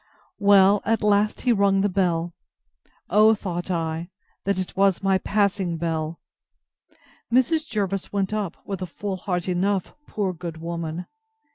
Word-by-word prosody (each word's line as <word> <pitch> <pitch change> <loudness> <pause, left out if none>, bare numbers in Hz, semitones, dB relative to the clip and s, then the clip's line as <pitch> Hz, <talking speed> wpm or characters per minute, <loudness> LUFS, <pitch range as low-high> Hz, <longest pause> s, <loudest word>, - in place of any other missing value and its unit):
Well, 200 0 +6
at 225 0 0
last 210 0 +2
he 245 - +3
rung 200 -2 +3
the 205 - +3
bell: 175 -3 0 0.8
O, 215 +3 +6
thought 175 -3 -5
I, 165 -1 -2 0.4
that 200 -1 +1
it 185 -1 -4
was 195 -1 +2
my 195 -1 +3
passing 195 -4 0
bell! 160 -1 -2 1.1
Mrs. 300 +6 +2
Jervis 195 -3 -2
went 200 0 -1
up, 205 -5 -2
with 195 -2 -5
a 185 - -3
full 195 +3 -4
heart 180 -1 -3
enough, 185 +1 0
poor 195 -3 -2
good 170 -1 -7
woman! 170 +1 -4
195 Hz, 145 wpm, -24 LUFS, 175-205 Hz, 1.1 s, Well